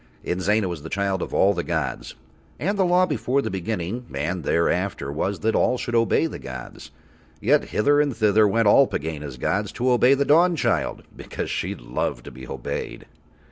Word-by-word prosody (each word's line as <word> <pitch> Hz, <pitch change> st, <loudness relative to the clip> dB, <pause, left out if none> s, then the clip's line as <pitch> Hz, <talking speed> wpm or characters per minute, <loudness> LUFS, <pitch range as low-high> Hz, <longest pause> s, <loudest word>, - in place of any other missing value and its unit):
Inzana 95 Hz, +3 st, +1 dB
was 85 Hz, -4 st, -5 dB
the 80 Hz, -, -8 dB
child 100 Hz, -1 st, -1 dB
of -, -, -4 dB
all 100 Hz, +1 st, +3 dB
the 85 Hz, -2 st, -3 dB
gods. -, -, -3 dB, 0.4 s
And 200 Hz, +6 st, 0 dB
the 195 Hz, -, +2 dB
law 180 Hz, +1 st, +4 dB
before 135 Hz, -3 st, 0 dB
the -, -, -3 dB
Beginning 95 Hz, +4 st, -4 dB
and 80 Hz, +6 st, -3 dB
thereafter 85 Hz, -2 st, 0 dB
was 95 Hz, +7 st, -2 dB
that 110 Hz, +1 st, +1 dB
all 125 Hz, -, +2 dB
should 120 Hz, -1 st, -5 dB
obey 115 Hz, +6 st, +3 dB
the 160 Hz, -, -5 dB
gods, 65 Hz, -1 st, -9 dB, 0.5 s
yet -, -, +2 dB
hither 145 Hz, +7 st, +2 dB
and 140 Hz, -6 st, -1 dB
thither 105 Hz, -1 st, +4 dB
went 115 Hz, +2 st, +2 dB
all 135 Hz, +6 st, +6 dB
Pegāna's 75 Hz, -3 st, -5 dB
gods 100 Hz, +10 st, -1 dB
to 125 Hz, +1 st, 0 dB
obey 125 Hz, +2 st, +5 dB
the 140 Hz, +1 st, 0 dB
Dawnchild 170 Hz, +3 st, +2 dB
because -, -, -5 dB
she -, -, -2 dB
loved -, -, -4 dB
to -, -, -9 dB
be 65 Hz, +1 st, -11 dB
obeyed. -, -, -5 dB
105 Hz, 180 wpm, -23 LUFS, 85-130 Hz, 0.5 s, all